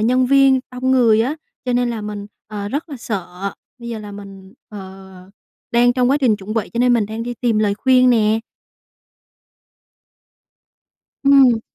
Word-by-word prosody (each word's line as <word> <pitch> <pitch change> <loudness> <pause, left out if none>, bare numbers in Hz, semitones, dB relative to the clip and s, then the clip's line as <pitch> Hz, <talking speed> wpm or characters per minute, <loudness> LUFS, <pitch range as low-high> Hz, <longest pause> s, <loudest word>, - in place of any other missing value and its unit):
nhân 250 +3 +2
viên, 270 -1 +4
đông 255 +1 -2
người 235 -4 +4
á, 265 +7 -1 0.3
cho 250 - -1
nên 245 0 +1
là 230 -2 -4
mình, 210 -1 -6 0.2
ờ, 205 -1 -6
rất 290 +8 -4
là 280 - -7
sợ. 195 -3 -5 0.3
Bây 235 -1 -9
giờ 230 - -5
là 210 -1 -9
mình, 195 -1 -12 0.2
ờ, 190 -2 -11 0.6
đang 245 +1 +4
trong 250 0 +1
quá 280 - +3
trình 250 -7 +2
chuẩn 205 +1 -7
bị 225 - -1
cho 235 - -4
nên 245 0 +3
mình 230 -4 +1
đang 220 +2 -5
đi 245 +1 -5
tìm 230 -3 +1
lời 205 -2 +1
khuyên 255 +2 +3
nè. 220 -1 +2 2.8
Ừm. 265 -5 +5
230 Hz, 175 wpm, -19 LUFS, 210-250 Hz, 2.8 s, Ừm